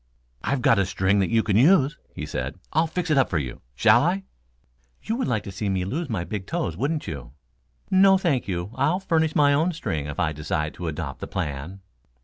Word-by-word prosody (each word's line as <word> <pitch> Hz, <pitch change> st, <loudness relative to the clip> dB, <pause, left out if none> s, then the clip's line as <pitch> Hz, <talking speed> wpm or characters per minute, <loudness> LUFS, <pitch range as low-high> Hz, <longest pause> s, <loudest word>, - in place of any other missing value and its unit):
"I've 135 Hz, -3 st, -1 dB
got 130 Hz, -7 st, +5 dB
a 95 Hz, -, +3 dB
string 95 Hz, +2 st, +1 dB
that 95 Hz, -, +1 dB
you 115 Hz, -1 st, +3 dB
can 105 Hz, -, 0 dB
use," 150 Hz, -, +5 dB, 0.2 s
he -, -, -4 dB
said. 65 Hz, +6 st, -4 dB, 0.2 s
"I'll 160 Hz, +2 st, +3 dB
fix 175 Hz, 0 st, -2 dB
it 145 Hz, -, +4 dB
up 130 Hz, -, +3 dB
for 85 Hz, -, 0 dB
you. 65 Hz, -5 st, -4 dB
Shall 110 Hz, -, +5 dB
I?" 185 Hz, +5 st, 0 dB, 0.8 s
"You 225 Hz, -, -1 dB
would 260 Hz, -, -1 dB
like 110 Hz, -5 st, 0 dB
to 100 Hz, -, -7 dB
see 100 Hz, +2 st, -3 dB
me 95 Hz, -1 st, 0 dB
lose 150 Hz, -, -3 dB
my 100 Hz, -7 st, -1 dB
big 95 Hz, 0 st, -5 dB
toes, 85 Hz, -, -2 dB
wouldn't 145 Hz, -, -1 dB
you? 70 Hz, -8 st, -7 dB, 0.6 s
No, 195 Hz, 0 st, +6 dB
thank 160 Hz, -, 0 dB
you, 90 Hz, +1 st, -3 dB
I'll 145 Hz, +8 st, +1 dB
furnish 160 Hz, -4 st, +1 dB
my 145 Hz, -1 st, +5 dB
own 160 Hz, +5 st, +2 dB
string 80 Hz, -, -3 dB
if 75 Hz, -, -6 dB
I 80 Hz, -3 st, +1 dB
decide 75 Hz, +1 st, -2 dB
to 90 Hz, -, -6 dB
adopt 80 Hz, -, -4 dB
the -, -, -6 dB
plan." 75 Hz, +7 st, -4 dB
110 Hz, 220 wpm, -24 LUFS, -, 0.8 s, No